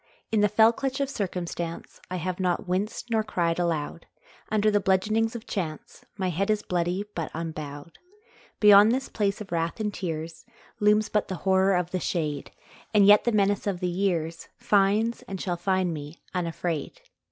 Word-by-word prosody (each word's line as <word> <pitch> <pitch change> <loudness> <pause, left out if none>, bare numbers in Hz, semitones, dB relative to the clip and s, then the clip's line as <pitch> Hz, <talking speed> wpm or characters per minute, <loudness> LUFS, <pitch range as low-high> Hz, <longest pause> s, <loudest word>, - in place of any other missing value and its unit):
In 220 -2 +3
the 210 - +4
fell 220 +2 +5
clutch 270 +2 -3
of 275 -1 -1
circumstance 175 -6 -4
I 185 - -3
have 180 +1 -3
not 180 0 0
winced 200 +6 -2
nor 220 -1 +2
cried 175 -5 -1
aloud, 165 -1 -2 0.4
Under 215 0 +2
the 205 - +3
bludgeonings 215 +4 +1
of 235 - -7
chance 160 -7 -5
My 190 -2 -1
head 195 +5 -1
is 210 -1 +1
bloody, 180 +3 -1
but 165 -3 -3
unbowed. 155 -1 -6 0.6
Beyond 210 +1 +8
this 265 +2 -1
place 205 -1 -1
of 200 - -9
wrath 165 +4 -1
and 210 -1 -2
tears 160 -3 -5 0.4
Looms 210 +1 +4
but 210 - 0
the 190 - -3
horror 190 0 +4
of 180 -1 -1
the 185 - -1
shade, 150 -6 -2 0.5
And 205 -1 +7
yet 205 +1 +7
the 240 - +3
menace 205 -1 +1
of 190 -3 -1
the 180 -1 -1
years 170 -3 -1
Finds, 210 +3 +2
and 195 -1 -5
shall 175 -1 -2
find 185 0 0
me, 150 +1 -7 0.2
unafraid. 175 - -3
190 Hz, 175 wpm, -26 LUFS, 170-210 Hz, 0.6 s, Beyond